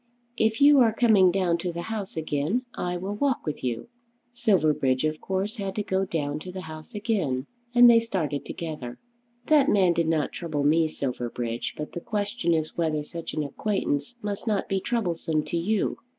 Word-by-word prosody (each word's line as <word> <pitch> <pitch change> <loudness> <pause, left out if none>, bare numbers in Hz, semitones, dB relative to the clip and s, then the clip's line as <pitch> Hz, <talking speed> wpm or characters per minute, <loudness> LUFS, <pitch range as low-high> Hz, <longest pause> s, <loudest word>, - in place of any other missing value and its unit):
If 220 -1 +1
you 285 0 +7
are 235 -3 +5
coming 215 -5 +5
down 175 -2 +1
to 175 +1 -2
the 170 0 -5
House 210 -5 -5
again 160 - -1
I 180 0 -2
will 190 +3 -4
walk 265 +4 0
with 150 -2 -4
you." 120 -2 -2 0.5
Silverbridge 155 - +2
of 155 0 -1
course 195 +4 -2
had 195 -2 -4
to 210 - -1
go 190 -1 0
down 150 -4 -2
to 180 +4 -8
the 185 +1 -6
House 155 +6 -10
again, 185 - -1 0.3
and 245 0 +9
they 235 -1 +8
started 165 - -2
together. 150 -8 -6 0.5
"That 295 -2 +4
man 185 -4 +4
did 170 -1 0
not 160 -2 +1
trouble 155 -5 -3
me, 160 +2 +4
Silverbridge; 120 -4 -3
but 150 - -5
the 175 - -6
question 205 -5 -1
is 155 -1 -2
whether 155 -3 0
such 165 +2 -7
an 155 - 0
acquaintance 145 - -2
must 205 +2 -4
not 210 -2 0
be 195 - 0
troublesome 170 -8 -1
to 170 - -3
you." 200 +5 0
175 Hz, 185 wpm, -26 LUFS, 155-210 Hz, 0.5 s, and